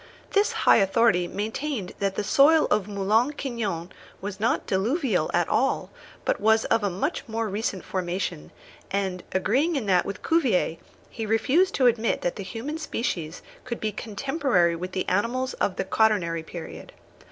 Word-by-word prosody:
This 405 +1 +3
high - - +7
authority 195 -3 +3
maintained 220 +2 -3
that 195 -1 -1
the 210 - -1
soil 290 +9 +5
of 210 -2 +2
Moulin 210 +7 +1
Quignon 215 - -4 0.3
was 195 0 -6
not 225 +3 +1
diluvial 210 - 0
at 175 -1 +1
all, 270 +2 0 0.3
but - - 0
was 220 +1 +4
of 225 - +2
much 280 - -2
more 225 0 -2
recent 200 -2 -3
formation; 175 - -3 0.4
and, 190 -2 -2
agreeing 265 - +1
in 265 -6 -1
that 185 -3 +3
with 200 - -6
Cuvier, 250 - +2 0.3
he 225 -1 -5
refused 280 - +2
to 260 - +2
admit 230 -2 +2
that 175 - -1
the - - -6
human 245 +11 -5
species 180 - -3 0.2
could 235 -2 -5
be 215 - -1
contemporary 215 - 0
with 180 +2 -6
the 185 - -2
animals 245 +7 0
of 190 - -1
the - - -2
quaternary 190 -5 +2
period. 160 0 -9
215 Hz, 160 wpm, -25 LUFS, 185-250 Hz, 0.4 s, high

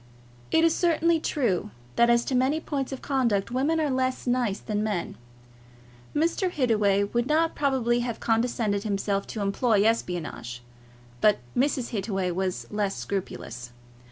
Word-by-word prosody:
It 320 - +3
is 330 -1 +4
certainly 335 -1 +2
true, 240 - 0 0.3
that 235 0 +4
as 235 0 +4
to - - -2
many 260 +5 +2
points 280 -4 -3
of 265 - -6
conduct, 235 -7 +1
women 285 +6 +1
are 300 -3 +1
less 260 0 -1
nice 245 -5 +1
than 210 -2 -3
men. 205 -5 -2 1.0
Mr. 335 +5 +1
Hittaway 215 - +2
would 235 +4 -1
not 320 +2 +2
probably 260 -4 +1
have 240 -1 -3
condescended 225 -3 +1
himself 200 -1 -1
to 215 - -5
employ 205 +1 +2
espionage, 170 - -2 0.6
but 210 -1 +5 0.2
Mrs. 260 -1 +1
Hittaway 195 -4 -1
was 185 +1 -2
less 205 -2 -1
scrupulous. 125 -10 -5
235 Hz, 145 wpm, -26 LUFS, 200-270 Hz, 1.0 s, but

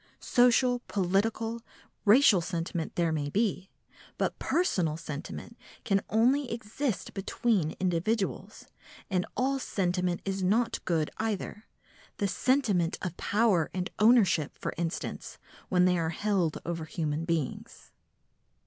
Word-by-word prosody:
Social, 245 0 +3
political, 220 +4 0 0.4
racial 210 -3 +6
sentiment 165 -1 -3
there 170 -2 +1
may 145 -2 -1
be, 195 0 -1 0.5
but - - -1
personal 180 - +1
sentiment 160 +7 -7 0.3
can 195 -3 +2
only 250 +5 +2
exist 230 0 -3
between 195 -4 0
individuals, 190 +4 -1 0.5
and 180 -1 0
all 270 +2 +1
sentiment 180 -5 -1
is 195 0 -2
not 225 +6 +1
good 160 -3 0
either,—the 210 -1 -5
sentiment 205 -7 +1
of 180 -2 -3
power 200 -7 +2
and 180 0 -2
ownership, 210 - +4
for - - -4
instance, 170 -1 -4 0.3
when 180 -1 +4
they 180 -1 +3
are 165 -1 0
held 180 -2 0
over 165 -2 -3
human 155 -1 -2
beings. 165 -5 -4
190 Hz, 115 wpm, -29 LUFS, 170-225 Hz, 0.5 s, racial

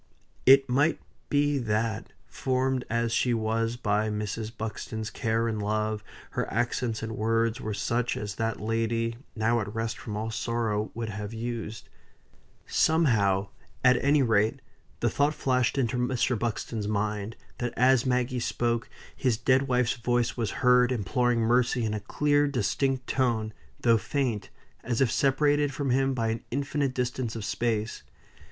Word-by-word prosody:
It 135 +1 +8
might 145 +5 +2 0.3
be 145 0 +2
that, 110 -1 -1
formed 130 0 -1
as 115 0 0
she 120 +1 +2
was 115 +1 0
by 105 -1 +1
Mrs. 105 +1 -3
Buxton's 110 0 -5
care 115 +1 0
and 110 -2 -2
love, 105 0 -1 0.3
her - - -2
accents 120 0 -1
and 110 - -3
words 115 +2 +1
were 110 -1 -3
such 115 +4 -1
as 105 -1 -4
that 115 +1 -2
lady, 115 +1 -1 0.2
now 115 +1 +2
at 105 -2 -4
rest 115 +1 -3
from 105 -3 -5
all 110 +1 -3
sorrow, 110 -2 -1
would 115 -1 -3
have 105 +1 -5
used; 115 -1 -5 0.8
somehow, 105 - +2 0.3
at 130 -1 +4
any 140 0 +4
rate, 110 -2 +2 0.4
the - - +3
thought 145 +2 +1
flashed 125 -1 +1
into 125 -2 +1
Mr. 125 0 +1
Buxton's 115 -2 -3
mind, 105 +1 -2 0.2
that 120 -1 -1
as 130 0 +5
Maggie 125 0 0
spoke, 120 -1 -1 0.3
his 125 -5 +1
dead 130 +3 +2
wife's 125 -2 +1
voice 120 0 0
was 115 -4 -1 0.2
heard, 125 0 +5
imploring 120 +2 +1
mercy 120 +1 +2
in 110 - -1
a 105 - -2
clear, 145 +7 +2
distinct 130 +1 0
tone, 115 -5 0 0.3
though 115 -2 +4
faint, 120 -6 -2 0.3
as 120 -1 -1
if 130 -4 +3
separated 145 +2 +2
from 140 -2 -2
him 135 +1 +2
by 115 -2 0
an 115 0 -3
infinite 140 0 -1
distance 125 -2 -2
of 110 -3 -4
space. 115 -1 -1
115 Hz, 155 wpm, -27 LUFS, 110-130 Hz, 0.8 s, It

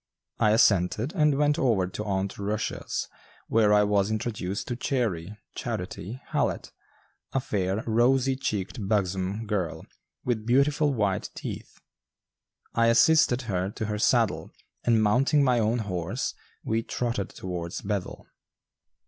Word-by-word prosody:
I 105 - +4
assented, 105 - +3
and 150 -6 +3
went 150 0 +2
over 110 -8 +2
to 95 +3 -5
"Aunt 95 -1 -2
Rushia's" 105 +1 -2 0.4
where 110 -2 +3
I 105 0 +5
was 100 -1 +2
introduced 105 -3 -3
to 120 - -1
"Chairy" 105 - -2 0.2
(Charity) 110 +9 -5
Hallett, - - -1 0.6
a 135 - +2
fair, 100 -3 -1
rosy 125 +4 +3
cheeked, 105 -4 -3
buxom 100 +1 0
girl, 105 -5 -2 0.4
with 115 -3 0
beautiful 140 +5 +3
white 105 -7 0
teeth. - - -7 1.0
I 115 0 +3
assisted 125 +1 +4
her 95 -4 -1
to 110 - -4
her 105 0 -3
saddle, 115 -2 +2 0.3
and 115 -2 +3
mounting 135 +7 +3
my 125 -3 +3
own 110 +2 +1
horse, 95 -7 -3 0.3
we 110 +1 0
trotted 115 -4 -2
towards 90 -2 -5
Bethel. 100 -2 -4
110 Hz, 130 wpm, -27 LUFS, 100-125 Hz, 1.0 s, I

